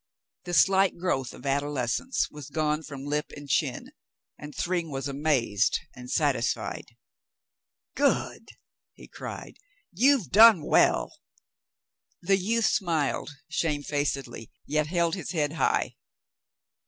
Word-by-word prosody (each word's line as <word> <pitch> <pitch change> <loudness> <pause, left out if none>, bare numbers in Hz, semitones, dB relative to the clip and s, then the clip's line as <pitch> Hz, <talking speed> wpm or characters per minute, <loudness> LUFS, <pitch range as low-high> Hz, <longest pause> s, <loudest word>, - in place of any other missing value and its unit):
The 175 -1 -2
slight 195 +1 +4
growth 155 -8 -1
of - - -13
adolescence 140 - -1
was 150 -1 -10
gone 155 0 0
from 140 -3 -9
lip 150 +1 -1
and 145 0 -10
chin, - - -1 0.4
and 150 0 -10
Thryng 175 -2 -1
was 135 -1 -4
amazed 135 -7 +1 0.2
and 125 0 -10
satisfied. 135 -5 -1 1.1
"Good," - - 0 0.5
he - - -14
cried. - - -8 0.3
"You've 235 - +3
done 215 -5 +8
well." - - +2 1.0
The 195 +2 +2
youth 225 +4 0
smiled 165 -9 0 0.2
shamefacedly, 145 -6 -2 0.2
yet 155 0 0
held 170 0 0
his 185 -1 -4
head 150 -3 0
high. 165 - 0
150 Hz, 115 wpm, -27 LUFS, 140-175 Hz, 1.1 s, done